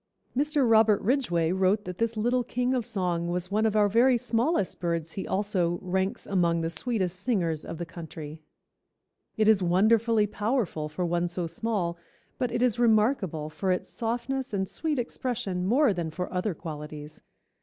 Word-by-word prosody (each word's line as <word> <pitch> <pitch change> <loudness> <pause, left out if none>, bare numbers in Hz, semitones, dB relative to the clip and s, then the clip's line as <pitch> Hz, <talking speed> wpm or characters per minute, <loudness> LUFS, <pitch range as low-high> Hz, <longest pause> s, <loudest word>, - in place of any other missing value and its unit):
Mr. 290 -1 +2
Robert 220 -2 +5
Ridgway 185 - +1
wrote 190 +3 +2
that 180 0 -6
this 230 0 -1
little 245 +3 +1
king 250 +1 -1
of 245 -3 -1
song 180 -6 -1
was 180 +1 -2
one 215 +2 +2
of 215 - -1
our 210 -1 +5
very 240 +5 +4
smallest 235 - 0
birds 170 -2 -2
he 190 - -5
also 190 -4 0
"ranks 190 +1 -2
among 170 -4 +1
the 165 0 -2
sweetest 190 -4 -1
singers 180 -9 0
of 165 - -6
the 175 - -4
country. 160 -2 -9 1.0
It 215 -1 +3
is 215 -3 +5
wonderfully 215 +5 +3
powerful 205 - -1
for 175 +4 -2
one 175 0 0
so 175 0 -3
small, 170 -1 -2 0.4
but 250 -2 0
it 240 +1 0
is 240 -2 +2
remarkable 215 - +2
for 190 +4 -1
its 180 - -1
softness 245 +2 -2
and 190 -1 -1
sweet 310 - -2
expression 220 -7 -2
more 255 +1 +4
than 170 -3 -3
for 180 +4 -5
other 185 0 -1
qualities. 150 -1 -8
195 Hz, 170 wpm, -27 LUFS, 175-230 Hz, 1.0 s, Robert